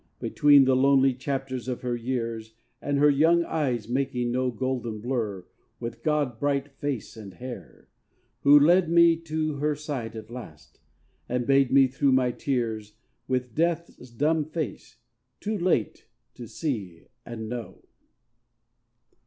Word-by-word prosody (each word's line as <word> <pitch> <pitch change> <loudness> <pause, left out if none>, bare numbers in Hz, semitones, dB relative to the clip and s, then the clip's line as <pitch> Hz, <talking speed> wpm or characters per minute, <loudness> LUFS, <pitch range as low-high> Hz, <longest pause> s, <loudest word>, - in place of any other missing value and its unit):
Between 145 -2 +5
the 130 0 +3
lonely 135 0 +4
chapters 130 -1 -4
of 125 -2 -3
her 125 -1 -2
years 115 -2 -4 0.3
And 145 0 -1
her 145 +1 +5
young 165 +4 +4
eyes 130 -10 -2
making 125 -1 -1
no 130 +1 0
golden 120 -3 -3
blur 110 -5 -3 0.3
With 115 -1 -6
god 145 -5 0
bright 140 0 -1
face 140 -6 -5
and 100 -5 -10
hair; 125 +2 -10 0.5
who 145 +1 +7
led 170 +3 +4
me 170 0 +6
to 155 -2 -3
Her 150 +1 0
side 140 -7 -5
at 110 +1 -9
last, 80 -11 -11 0.5
and 125 0 -1
bade 135 -1 +3
me, 135 0 +6
through 135 +1 +1
my 130 -1 +3
tears, 115 -6 -3 0.3
With 125 -2 -2
Death's 165 -4 -2
dumb 150 +6 0
face, 155 -7 -6 0.4
too 210 0 -3
late, 170 - 0 0.3
to 120 - -9
see 105 - -4 0.2
and 110 -2 -7
know. 120 0 -7
130 Hz, 140 wpm, -26 LUFS, 120-145 Hz, 0.5 s, who